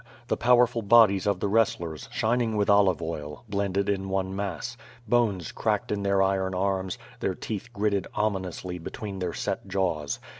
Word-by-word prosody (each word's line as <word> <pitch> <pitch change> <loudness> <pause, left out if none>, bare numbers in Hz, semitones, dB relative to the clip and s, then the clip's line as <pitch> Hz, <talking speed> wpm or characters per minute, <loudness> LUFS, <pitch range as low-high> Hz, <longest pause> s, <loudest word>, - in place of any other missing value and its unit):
The - - +2
powerful 120 -1 +4
bodies 105 -2 +5
of 100 -3 +1
the - - +1
wrestlers, 85 - 0
shining 115 -1 +1
with 100 -1 +3
olive 95 -4 +4
oil, 75 -1 -5
blended 100 -1 -1
in 95 -1 -1
one 95 0 -1
mass; 100 +3 -4 0.3
bones 105 -7 +1
cracked - - -1
in 105 -1 -1
their 100 -1 +3
iron 95 -1 0
arms, 95 0 -1 0.2
their - - -1
teeth 115 +3 -5
gritted 100 -3 0
ominously 95 -4 -2
between 100 +3 -6
their 90 -2 -2
set - - -3
jaws. 80 -8 -1
100 Hz, 160 wpm, -27 LUFS, 95-105 Hz, 0.3 s, bodies